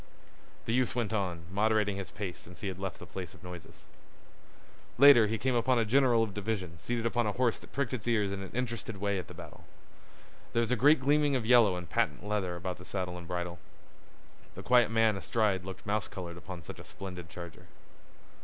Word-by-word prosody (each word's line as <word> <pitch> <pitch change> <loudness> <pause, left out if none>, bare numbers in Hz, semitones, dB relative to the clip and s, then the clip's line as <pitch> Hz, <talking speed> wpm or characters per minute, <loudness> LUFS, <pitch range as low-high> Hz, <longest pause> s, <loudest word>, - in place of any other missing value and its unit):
The 115 - -1
youth 125 -1 +1
went 115 -4 -1
on, 90 -5 -2
moderating 105 0 +2
his 100 -2 -5
pace 95 -5 -5
since 90 +2 -13
he 100 - -2
had 95 0 -7
left 95 -1 -4
the - - -10
place 95 -1 -7
of 95 - -18
noises. 90 -2 -10 1.1
Later 125 -4 +8
he 110 +2 -1
came 130 +4 0
upon 120 +2 +2
a 115 - +2
general 120 0 +4
of 105 -3 -4
division 95 -5 -3
seated 115 +5 -2
upon 115 -1 +1
a 105 - 0
horse 125 -2 +1
that - - -15
pricked 135 -4 -1
its 120 -2 -4
ears 105 -4 +2
in 100 0 -4
an 95 - -6
interested 115 -4 -3
way 100 0 0
at 90 - -7
the - - -11
battle. - - -11 0.9
There - - +2
was 115 0 -1
a - - +4
great 145 +7 +5
gleaming 145 +1 +3
of 125 -4 -1
yellow 115 -5 +6
and 90 -1 -6
patent 75 - 0
leather 100 -4 -1
about 90 +1 -4
the - - -10
saddle 90 -2 -3
and 85 -1 -8
bridle. 90 -1 -4 1.0
The - - -8
quiet 125 -1 +5
man 115 -1 +3
astride 95 -2 0
looked 95 -1 -8
mouse 105 -1 0
colored 90 -4 -7
upon 90 -1 -8
such - - -9
a - - -9
splendid 90 -3 -8
charger. 85 -2 -10
105 Hz, 210 wpm, -31 LUFS, 90-115 Hz, 1.1 s, Later